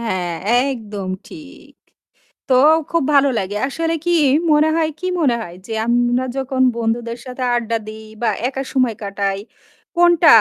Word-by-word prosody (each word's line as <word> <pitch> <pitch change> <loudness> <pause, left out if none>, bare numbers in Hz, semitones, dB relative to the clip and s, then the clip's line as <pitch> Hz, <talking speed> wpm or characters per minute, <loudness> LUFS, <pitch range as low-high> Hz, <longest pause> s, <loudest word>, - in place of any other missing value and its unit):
হ্যাঁ, 185 -7 -2 0.4
একদম 210 -6 -6 0.2
ঠিক। 305 -5 -13 0.8
তো, 255 - +4 0.4
খুব 335 -3 +1
ভালো 280 -1 +5
লাগে। 195 +2 -4
আসলে 330 +4 -2
কী, 350 - +1 0.4
মনে 300 +1 +4
হয়, 320 -1 +1
কী 370 - -3
মনে 260 -6 +3
হয়? 175 -5 -8
যে - - -8 0.2
আমরা 245 +1 +2
যখন 265 -1 -1 0.2
বন্ধুদের 230 +1 -2
সাথে 255 0 -5
আড্ডা 230 -1 -1
দিই 220 0 -9 0.2
বা 235 - +2 0.2
একা 270 0 -4
সময় 255 -4 +1
কাটাই, 200 -1 -2 0.6
কোনটা 345 -1 +4
245 Hz, 150 wpm, -19 LUFS, 220-280 Hz, 0.8 s, ভালো